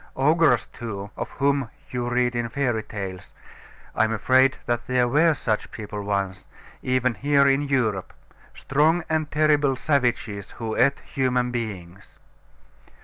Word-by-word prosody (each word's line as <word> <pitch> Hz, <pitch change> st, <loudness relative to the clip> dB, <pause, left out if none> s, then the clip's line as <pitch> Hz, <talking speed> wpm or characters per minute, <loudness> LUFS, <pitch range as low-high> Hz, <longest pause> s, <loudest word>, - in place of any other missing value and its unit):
Ogres, 155 Hz, +4 st, +3 dB
too 105 Hz, -4 st, -6 dB
of -, -, -5 dB
whom 140 Hz, -3 st, +1 dB, 0.2 s
you 120 Hz, -1 st, -2 dB
read 125 Hz, 0 st, +1 dB
in 120 Hz, 0 st, -1 dB
fairy 120 Hz, -3 st, 0 dB
tales 95 Hz, -4 st, -7 dB, 0.6 s
I -, -, +2 dB
am 110 Hz, -, +1 dB
afraid 130 Hz, +4 st, +3 dB
that 120 Hz, 0 st, -2 dB
there 125 Hz, -1 st, +2 dB
were 155 Hz, +5 st, +3 dB
such 110 Hz, -5 st, -2 dB
people 105 Hz, -1 st, -7 dB
once, 100 Hz, -3 st, -3 dB, 0.3 s
even 130 Hz, -1 st, +1 dB
here 140 Hz, +3 st, +3 dB
in 135 Hz, +1 st, +3 dB
Europe; 125 Hz, -9 st, -1 dB, 0.4 s
strong 155 Hz, +5 st, +2 dB
and 155 Hz, -1 st, 0 dB
terrible 150 Hz, -3 st, +2 dB
savages, 120 Hz, -8 st, -1 dB
who 110 Hz, -2 st, -4 dB
ate 140 Hz, -, +2 dB
human 125 Hz, -2 st, -1 dB
beings. 100 Hz, -5 st, -6 dB
125 Hz, 140 wpm, -24 LUFS, 110-140 Hz, 0.6 s, Ogres